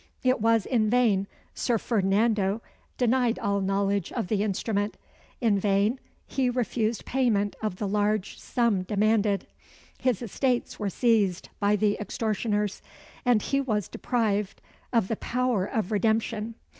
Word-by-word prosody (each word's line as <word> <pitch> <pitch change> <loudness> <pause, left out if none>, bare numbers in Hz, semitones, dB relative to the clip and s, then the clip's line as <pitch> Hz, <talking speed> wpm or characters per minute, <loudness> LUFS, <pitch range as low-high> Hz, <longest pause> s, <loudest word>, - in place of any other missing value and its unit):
It 255 -2 +2
was 225 -1 +3
in 220 -4 +1
vain 215 -5 +3 0.3
Sir 240 -2 0
Ferdinando 210 0 +1 0.3
denied 245 -1 +2
all 200 -2 0
knowledge 195 -1 0
of 230 -7 -3
the 210 -2 +1
instrument 205 0 -1 0.4
in 220 -5 +2
vain 205 +5 +2 0.3
he 260 -2 0
refused 235 -2 -1
payment 220 -6 +1
of 215 -4 -2
the 205 +2 -3
large 210 0 0
sum 235 -6 +1
demanded 205 0 +1 0.5
his 250 -3 0
estates 245 +3 -1
were 205 - -1
seized 205 -5 +1
by 205 +1 +3
the 210 0 +1
extortioners 210 -1 -1 0.4
and 240 -4 +3
he 275 0 +1
was 215 -7 -1
deprived 210 -5 -1 0.3
of 230 -6 +2
the 225 - -2
power 245 -6 0
of 220 -4 -2
redemption. 220 +1 0
215 Hz, 135 wpm, -27 LUFS, 200-235 Hz, 0.5 s, was